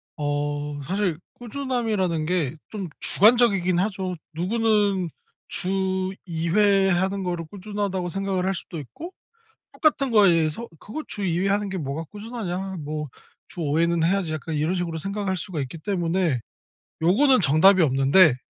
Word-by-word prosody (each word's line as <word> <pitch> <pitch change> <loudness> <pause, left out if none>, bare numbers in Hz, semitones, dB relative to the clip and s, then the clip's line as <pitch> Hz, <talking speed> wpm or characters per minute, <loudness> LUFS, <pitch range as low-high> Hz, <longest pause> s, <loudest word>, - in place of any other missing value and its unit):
어 145 0 -2
사실 185 -1 -1 0.2
꾸준함이라는 230 - -1
게 165 -4 0
좀 200 -4 -5
주관적이긴 200 -5 +4
하죠. 190 -2 -1 0.2
누구는 200 0 +1 0.4
'주 190 0 -1
2 165 -2 -3
회 200 0 +4
하는 190 +2 0
거를 175 -2 -3
꾸준하다.'고 200 -2 -3
생각을 195 -1 -1
할 195 - +1
수도 170 -1 -7
있고 225 - -9 0.6
똑같은 295 -4 +2
거에서 180 -1 +3
'그거 305 +10 -6
주 205 - -3
2 170 -1 0
회 195 - +1
하는 205 0 0
게 190 - -3
뭐가 150 +1 -3
꾸준하냐. 195 -4 -5
뭐 150 0 -4 0.4
주 175 - -7
5 150 +1 +1
회는 170 -1 +2
해야지.' 175 -2 +1
약간 155 +1 -4
이런 155 +5 0
식으로 170 -2 -2
생각할 195 +1 -2
수가 165 -3 -4
있기 135 +5 -6
때문에 170 -4 0 0.6
요거는 245 - +4
정답이 180 +6 +5
없는데 135 +2 +5
185 Hz, 300 characters per minute, -24 LUFS, 165-200 Hz, 0.6 s, 정답이